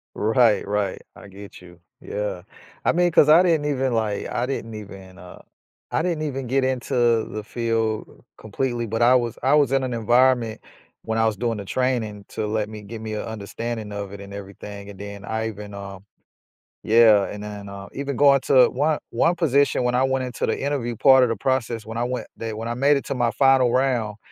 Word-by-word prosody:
Right, 110 Hz, -1 st, +2 dB
right, 100 Hz, -2 st, -1 dB
I -, -, -13 dB
get 100 Hz, +1 st, -12 dB
you, 90 Hz, -1 st, -16 dB, 0.2 s
yeah, 105 Hz, -4 st, -4 dB, 0.4 s
I -, -, +4 dB
mean, 175 Hz, +1 st, +2 dB
'cause 155 Hz, -2 st, +5 dB
I 160 Hz, +3 st, +8 dB
didn't 165 Hz, -5 st, +2 dB
even, 135 Hz, -3 st, 0 dB
like, 110 Hz, -3 st, -1 dB
I 120 Hz, -, -1 dB
didn't 115 Hz, -4 st, -5 dB
even, 95 Hz, -3 st, -11 dB
uh, 90 Hz, -2 st, -13 dB, 0.5 s
I -, -, +1 dB
didn't 170 Hz, -3 st, -1 dB
even 135 Hz, -3 st, -3 dB
get 135 Hz, +2 st, +1 dB
into 120 Hz, -3 st, +1 dB
the 110 Hz, 0 st, -6 dB
field 115 Hz, -1 st, -2 dB
completely, 120 Hz, +2 st, -3 dB
but, 115 Hz, +1 st, -3 dB
I 120 Hz, +2 st, +6 dB
was 120 Hz, -3 st, -1 dB
I 135 Hz, +3 st, +3 dB
was 145 Hz, -4 st, +3 dB
in 135 Hz, -1 st, +2 dB
an 130 Hz, -1 st, -3 dB
environment 120 Hz, 0 st, +2 dB, 0.4 s
when 110 Hz, 0 st, -2 dB
I 115 Hz, -, +3 dB
was 110 Hz, -1 st, +1 dB
doing 115 Hz, +2 st, -2 dB
the 100 Hz, -, -7 dB
training 110 Hz, -4 st, -2 dB
to 110 Hz, -, -3 dB
let 105 Hz, 0 st, -2 dB
me, 110 Hz, -1 st, -8 dB
give 110 Hz, +2 st, -8 dB
me 110 Hz, -1 st, -5 dB
an -, -, -3 dB
understanding 110 Hz, +1 st, -5 dB
of 100 Hz, -1 st, -6 dB
it 100 Hz, -, -9 dB
and 100 Hz, 0 st, -10 dB
everything 100 Hz, 0 st, -9 dB
and 100 Hz, -, -11 dB
then 100 Hz, 0 st, -8 dB
I 110 Hz, 0 st, -2 dB
even, 105 Hz, -1 st, -8 dB
uh, 100 Hz, -1 st, -8 dB, 0.8 s
yeah, 110 Hz, -3 st, +5 dB
and 105 Hz, -, -7 dB
then, 105 Hz, -1 st, -8 dB
uh, 100 Hz, 0 st, -9 dB
even 140 Hz, 0 st, -4 dB
going 140 Hz, 0 st, +5 dB
to 130 Hz, -2 st, +5 dB
one 150 Hz, +4 st, 0 dB
one 165 Hz, +9 st, +2 dB
position 140 Hz, -6 st, +2 dB
when 125 Hz, 0 st, +1 dB
I 130 Hz, -, +3 dB
went 130 Hz, 0 st, 0 dB
into 125 Hz, -2 st, -3 dB
the -, -, -1 dB
interview 135 Hz, -4 st, -2 dB
part 130 Hz, +2 st, +6 dB
of 125 Hz, -, +2 dB
the 115 Hz, -, 0 dB
process 115 Hz, -1 st, -1 dB
when 110 Hz, +2 st, -7 dB
I 120 Hz, -, 0 dB
went, 125 Hz, 0 st, -3 dB
they 115 Hz, -1 st, -4 dB
when 110 Hz, +2 st, -5 dB
I 120 Hz, -, -3 dB
made 140 Hz, +4 st, +3 dB
it 140 Hz, -, -5 dB
to -, -, -3 dB
my 120 Hz, -2 st, +1 dB
final 130 Hz, +1 st, +4 dB
round. 120 Hz, -6 st, 0 dB
115 Hz, 215 wpm, -23 LUFS, 105-130 Hz, 0.8 s, I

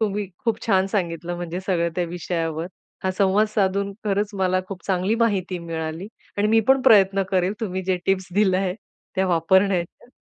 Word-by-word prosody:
तुम्ही 210 Hz, -1 st, -1 dB, 0.2 s
खूप 230 Hz, -2 st, +1 dB
छान 190 Hz, -3 st, +3 dB
सांगितलं 175 Hz, -3 st, -2 dB
म्हणजे 175 Hz, +1 st, -4 dB
सगळं 175 Hz, -3 st, 0 dB
त्या 180 Hz, -, +1 dB
विषयावर. 165 Hz, -1 st, -3 dB, 0.4 s
हा 190 Hz, -, +2 dB
संवाद 195 Hz, +3 st, +3 dB
साधून 200 Hz, -1 st, 0 dB
खरंच 205 Hz, 0 st, 0 dB
मला 185 Hz, -1 st, +2 dB
खूप 195 Hz, -2 st, -7 dB
चांगली 190 Hz, +2 st, +1 dB
माहिती 195 Hz, -6 st, 0 dB
मिळाली 165 Hz, +2 st, -5 dB, 0.3 s
आणि 205 Hz, +1 st, +2 dB
मी 225 Hz, +1 st, +5 dB
पण 265 Hz, 0 st, +5 dB
प्रयत्न 195 Hz, -3 st, +5 dB
करेल 185 Hz, 0 st, +1 dB
तुम्ही 190 Hz, -3 st, -3 dB
जे 185 Hz, 0 st, 0 dB
टिप्स 190 Hz, -1 st, +1 dB
दिल्या 195 Hz, -2 st, +3 dB
आहे 185 Hz, -2 st, -1 dB, 0.4 s
त्या 190 Hz, -1 st, +1 dB
वापरण्याच्या. 180 Hz, +4 st, +1 dB
190 Hz, 170 wpm, -23 LUFS, 175-200 Hz, 0.4 s, मी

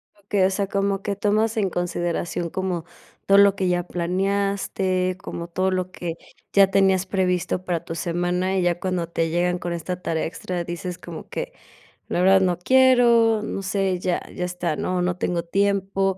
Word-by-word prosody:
Okey, 200 Hz, -1 st, 0 dB
o -, -, +3 dB
sea, 195 Hz, 0 st, -1 dB
como 200 Hz, 0 st, 0 dB
que 200 Hz, 0 st, -2 dB
tomas 215 Hz, +3 st, +1 dB
en 200 Hz, -3 st, +1 dB
consideración 175 Hz, -1 st, -2 dB
como 180 Hz, -3 st, -3 dB, 0.4 s
todo 195 Hz, -, +5 dB
lo 200 Hz, 0 st, +6 dB
que 190 Hz, -2 st, -1 dB
ya 175 Hz, 0 st, +1 dB
planeaste, 185 Hz, +1 st, -1 dB
como 170 Hz, -3 st, -6 dB
todo 185 Hz, +2 st, 0 dB
lo 185 Hz, 0 st, -2 dB
que 170 Hz, -3 st, -5 dB, 0.4 s
ya 195 Hz, -1 st, +7 dB
tenías 190 Hz, -1 st, +3 dB
previsto 180 Hz, -1 st, 0 dB
para 170 Hz, -2 st, -1 dB
tu 165 Hz, -1 st, -6 dB
semana, 180 Hz, +2 st, -1 dB
y -, -, +2 dB
ya 175 Hz, 0 st, +1 dB
cuando 185 Hz, -2 st, -2 dB
te 165 Hz, -1 st, -1 dB
llegan 175 Hz, +2 st, 0 dB
con 175 Hz, 0 st, -3 dB
esta 180 Hz, +2 st, -4 dB
tarea 160 Hz, -3 st, -1 dB
extra, 175 Hz, +1 st, -4 dB
dices 175 Hz, +1 st, -5 dB
como -, -, -9 dB
que: -, -, -5 dB, 0.6 s
"La -, -, 0 dB
verdad, 190 Hz, +1 st, +6 dB
no 180 Hz, -2 st, +1 dB
quiero, 235 Hz, -1 st, +5 dB
no 195 Hz, -, -4 dB
sé, 190 Hz, -1 st, 0 dB
ya 180 Hz, -1 st, 0 dB
ya 180 Hz, -, -3 dB
está, 175 Hz, -3 st, -2 dB
¿no?, 180 Hz, +2 st, -1 dB
no 180 Hz, 0 st, 0 dB
tengo 175 Hz, -1 st, -1 dB
tiempo". 195 Hz, +1 st, +1 dB
185 Hz, 180 wpm, -23 LUFS, 175-195 Hz, 0.6 s, ya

